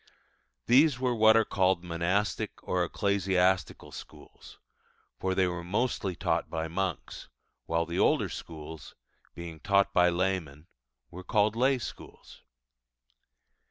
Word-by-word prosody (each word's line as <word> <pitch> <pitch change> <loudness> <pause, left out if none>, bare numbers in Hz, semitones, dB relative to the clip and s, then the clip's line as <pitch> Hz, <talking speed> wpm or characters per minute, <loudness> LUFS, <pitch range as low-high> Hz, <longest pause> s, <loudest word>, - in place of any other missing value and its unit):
These 135 +2 +4
were 125 -1 +1
what 110 -1 +5
are 110 - +3
called 95 -3 +1
monastic 90 +4 -1
or 90 -1 +1
ecclesiastical 95 0 0
schools, - - -13 0.6
for 95 0 -1
they 95 - +3
were 90 -1 -3
mostly 100 0 -1
taught - - -1
by 80 0 -3
monks; 90 0 -4 0.4
while 85 0 0
the 85 +1 -3
older - - +3
schools, 80 -1 -9 0.4
being 85 -2 -8
taught 100 +2 +2
by 90 0 +5
laymen, 85 -5 -2 0.5
were 90 +2 -9
called 105 +2 +1
lay 130 +3 +3
schools. 120 - -10
95 Hz, 125 wpm, -29 LUFS, 85-105 Hz, 0.6 s, what